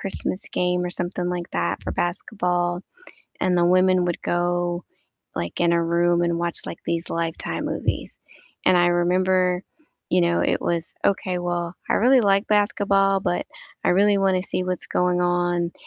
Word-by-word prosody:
Christmas 195 -1 -4
game 180 0 0
or - - -2
something 175 0 -3
like 175 -1 -4
that 85 +2 -2
for - - -4
basketball, 175 -1 -1 0.6
and 180 -1 +2
the 175 - +3
women 185 0 +4
would 175 -1 -2
go, 175 0 -1 0.5
like, 85 0 -4
in 170 -1 +3
a 170 0 +2
room 170 +1 +2
and 170 -1 0
watch, 170 0 -3
like, - - -7
these 170 0 -2
Lifetime 165 -1 -3
movies, - - -3 0.5
and 185 - +6
I 175 0 +4
remember, 180 +1 +2 0.5
you 180 - +3
know, 170 0 +2
it - - +1
was 170 -1 -2
"Okay, 185 -2 +1
well, 175 -1 -2
I - - +2
really 255 +3 +5
like 200 -1 +2
basketball, 200 -2 +2
but 175 - -1 0.4
I - - +2
really 200 +2 +4
wanna 190 -2 +2
see 185 -1 -3
what's 180 -1 -3
going 180 0 +1
on," 175 -1 0
175 Hz, 165 wpm, -23 LUFS, 175-185 Hz, 0.6 s, and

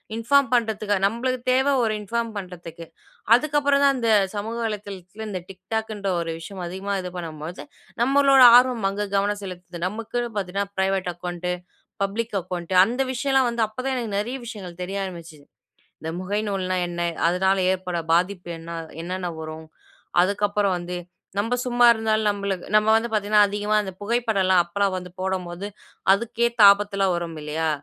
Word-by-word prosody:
Inform 270 +4 +3
பண்ணுறதுக்கு. 215 -3 +1
நம்மளுக்கு 250 +4 -1
தேவ 265 +2 +3
ஒரு 220 -1 +1
இன்ஃபார்ம் 230 +2 -2
பண்ணுறதுக்கு. 170 -3 -8 0.5
அதுக்கப்பறம் 285 0 +2
தான், 275 -1 +5
அந்த 230 -2 +1 0.2
சமூக 220 +3 -3
வலைதளத்தில 205 -1 -6
இந்த 185 - -3
TikTokகுன்ற 210 +2 -4
ஒரு 165 -1 -3
விஷயம் 185 +2 -8
அதிகமா 190 +3 -4
இது 180 -1 -6
பண்ணும்பொழுது, 160 0 -7 0.4
நம்மளோட 275 +1 +5
ஆர்வம் 250 -5 +2
அங்க 205 +1 -3
கவனம் 205 +1 0
செலுத்துது. 180 -2 -8
நம்மக்குன்னு 230 +3 -3
பார்த்தீங்கன்னா, 195 +1 -2
பிரைவேட் 190 -1 0
அக்கவுண்ட்டு, 175 +1 -4 0.5
பப்ளிக் 215 +2 -2
அக்கவுண்ட்டு 180 0 -4
அந்த 245 +4 -2
விஷயம்ல்லாம் 265 0 +2
வந்து 235 -1 0
அப்ப 215 - -24
தான், 265 - 0
எனக்கு 225 -4 -3
நெறைய 240 +5 -3
விஷயங்கள் 185 -7 -8
தெரிய 195 +2 -4
ஆரம்பிச்சுது. 165 -5 -10 0.5
இந்த 160 - -5
முகை 200 +3 -1
நூல்ன்னா 185 -2 -1
என்ன? 175 0 -4 0.3
அதனால 190 +2 +2 0.2
ஏற்படுற 180 -2 -3
பாதிப்பு 180 +1 0
என்ன? 165 +1 -11
அ - - -8 0.2
என்னன்ன 185 +1 -3
வரும்? 155 0 -8 0.5
அதுக்கப்புறம் 205 +1 +1
வந்து 175 +1 -5 0.4
நம்ப 225 +4 0
சும்மா 245 -1 +4
இருந்தாலும், 220 -1 0
நம்மலுக் 200 -2 -3
நம்ம 215 0 +4
வந்து 235 +1 -2
பாத்தீங்கன்னா, 210 0 +4
அதிகமா 205 +1 -1
அந்த 190 -2 -6
புகைப்படல்லாம் 205 -6 +2
அப்பல்லாம் 195 +2 0
வந்து 180 -1 -8
போடும்போது, 185 0 -3 0.5
அதுக்கேத்த 235 +2 0
ஆபத்தெல்லாம் 200 -2 0
வரும் 165 -2 -5
இல்லையா? 160 +2 -1
200 Hz, 150 wpm, -24 LUFS, 180-225 Hz, 0.5 s, தான்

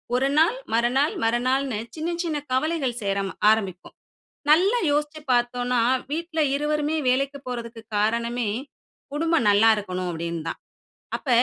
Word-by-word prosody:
ஒரு 260 +2 +2
நாள் 335 +10 +4 0.2
மறுநாள் 250 +6 +2
மறுநாள்னு 250 +1 +1 0.2
சின்ன 320 +1 -3
சின்ன 315 -3 -1
கவலைகள் 265 -2 0
சேர 195 -1 -1 0.2
ஆரம்பிக்கும். 195 -5 -1 0.6
நல்லா 380 +10 +5
யோசிச்சு 300 +1 -1
பார்த்தோன்னா, 245 0 +1 0.3
வீட்ல 325 +1 -2
இருவருமே 300 +1 0
வேலைக்கு 275 +2 +1
போறதக்கு 235 -2 -6
காரணமே 235 +2 0 0.7
குடும்பம் 325 -4 +1
நல்லா 205 +3 +5
இருக்கணும் 185 -3 -3
அப்டின்னு 170 0 -4
தான். - - -5 0.6
அப்ப - - -12
250 Hz, 120 wpm, -24 LUFS, 225-300 Hz, 0.7 s, நல்லா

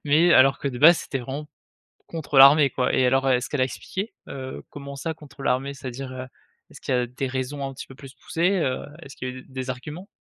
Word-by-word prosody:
mais 160 +4 +4
alors 135 +1 +6
que 140 - -2
de 125 -2 -6
base 165 +3 +8
c'était 135 - -4
vraiment 135 +4 -6 0.6
contre 155 -4 -3
l'armée 140 +1 +8
quoi. 125 0 -1
Et 130 - +3
alors 135 +1 +2
est-ce 125 0 +1
qu'elle 145 - -1
a - - +6
expliqué, 195 - -6
heu, 130 -1 -7
comment 140 -1 -8
ça 160 +3 -3
contre 150 -2 -14
l'armée? 135 +2 0
C'est-à-dire, 130 -1 -7
heu, 130 0 -6 0.4
est-ce - - -14
qu'il - - -2
y 125 - +3
a 125 - 0
des 130 +2 -4
raisons 135 +2 -3
un 135 - -7
petit 135 - -9
peu 135 - -13
plus 135 0 -12
poussées, 180 +4 0
heu, 130 -6 -1 0.2
est-ce 140 -4 -11
qu'il 130 - -5
y - - -4
a - - -10
eu 130 - -10
des 130 -1 -6
arguments? 150 +9 -6
135 Hz, 245 wpm, -24 LUFS, 130-145 Hz, 0.6 s, base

